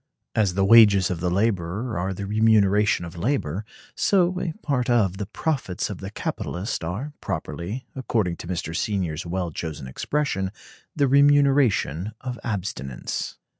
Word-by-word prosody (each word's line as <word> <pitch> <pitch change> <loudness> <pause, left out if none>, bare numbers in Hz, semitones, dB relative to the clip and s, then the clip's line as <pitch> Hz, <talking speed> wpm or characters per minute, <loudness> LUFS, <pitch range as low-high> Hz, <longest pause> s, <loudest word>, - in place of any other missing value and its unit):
As 100 -5 +1
the 95 0 +3
wages 100 -4 +7
of 90 - -3
the 90 +1 0
laborer 100 +3 0
are 90 +2 -1
the 100 +1 -5
remuneration 105 -2 +3
of 85 - -9
labor, 100 - -1 0.3
so 185 -2 +2
[a 165 - -1
part 125 -5 0
of] 105 -6 +2
the 100 -1 -4
profits 125 - -2
of 95 - -7
the 95 - -6
capitalist 95 -2 -4
are 105 - -4
properly, 105 +10 -4
according 110 -9 -1
to - - -9
Mr. 85 -2 -3
Senior's 90 -4 -2
well 90 -1 -2
chosen 75 -3 -5
expression, 95 - -1 0.4
the 140 -2 +3
remuneration 140 - +3
of 125 -2 -5
abstinence. 90 - -4
100 Hz, 145 wpm, -24 LUFS, 90-120 Hz, 0.4 s, wages